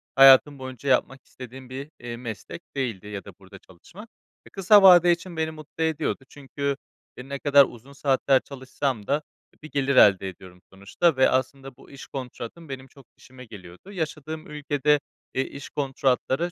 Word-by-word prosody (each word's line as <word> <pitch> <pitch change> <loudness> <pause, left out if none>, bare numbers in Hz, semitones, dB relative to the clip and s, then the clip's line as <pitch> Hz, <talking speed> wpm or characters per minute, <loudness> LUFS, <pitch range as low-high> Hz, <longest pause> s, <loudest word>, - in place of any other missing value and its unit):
hayatım 135 +1 +7
boyunca 130 +1 -6
yapmak 130 +1 +1
istediğim 130 0 -11
bir, 135 +3 -7
eee, 120 -1 -7
meslek 115 +6 -8
değildi 115 -8 -3
ya 105 -1 -7
da 100 - -10
burada 95 0 -14
çalışmak. 185 - -15 0.4
Kısa 200 +2 +6
vade 180 -2 +8
için 170 0 -3
beni 160 0 -1
mutlu 155 +1 -7
ediyordu 160 -3 -2
çünkü, 140 0 -4 0.4
eee, 125 +2 -10
ne 140 0 -4
kadar 140 -1 +6
uzun 125 +3 -13
saatler 135 -1 +2
çalışsam 130 -4 -4
da 145 +2 +1 0.4
bir 155 - -10
gelir 140 -1 0
elde 95 -5 +5
ediyorum 90 0 -14
sonuçta 100 - 0
ve 130 - +5
aslında 130 0 -2
bu - - -18
iş 140 -1 -11
kontratım 135 +4 -8
benim 135 -1 -7
çok 135 0 -19
işime 130 0 -14
geliyordu. 95 - -13
Yaşadığım 160 -3 -5
ülkede, 150 0 0 0.3
eee, 130 - 0
iş 140 - -10
kontratları 135 +3 -1
135 Hz, 165 wpm, -25 LUFS, 125-150 Hz, 0.4 s, vade